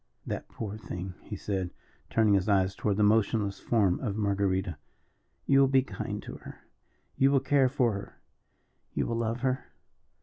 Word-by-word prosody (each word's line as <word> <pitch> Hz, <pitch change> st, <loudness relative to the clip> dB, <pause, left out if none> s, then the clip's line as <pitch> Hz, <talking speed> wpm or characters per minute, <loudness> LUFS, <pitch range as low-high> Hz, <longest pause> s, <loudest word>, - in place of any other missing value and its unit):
"That -, -, -4 dB
poor 105 Hz, -1 st, -5 dB
thing," 90 Hz, -3 st, -6 dB
he 105 Hz, -, -7 dB
said, 95 Hz, -2 st, -2 dB, 0.4 s
turning 110 Hz, -2 st, +3 dB
his 100 Hz, +1 st, +2 dB
eyes 95 Hz, -1 st, +3 dB
toward 100 Hz, 0 st, -1 dB
the 105 Hz, -, +3 dB
motionless 105 Hz, -1 st, +2 dB
form 100 Hz, -6 st, +2 dB
of 105 Hz, -6 st, -2 dB
Marguerita, 100 Hz, -4 st, 0 dB, 0.7 s
"you 135 Hz, -, +5 dB
will 135 Hz, -, +6 dB
be 135 Hz, -1 st, +4 dB
kind -, -, -5 dB
to -, -, -8 dB
her -, -, -12 dB, 0.6 s
you 135 Hz, -, +5 dB
will 140 Hz, -1 st, +4 dB
care 135 Hz, -1 st, +3 dB
for 125 Hz, -4 st, +2 dB
her 100 Hz, -, -8 dB, 0.8 s
you -, -, +1 dB
will 115 Hz, -, -1 dB
love 115 Hz, +1 st, -1 dB
her?" 130 Hz, 0 st, -1 dB
105 Hz, 170 wpm, -29 LUFS, 100-125 Hz, 0.8 s, will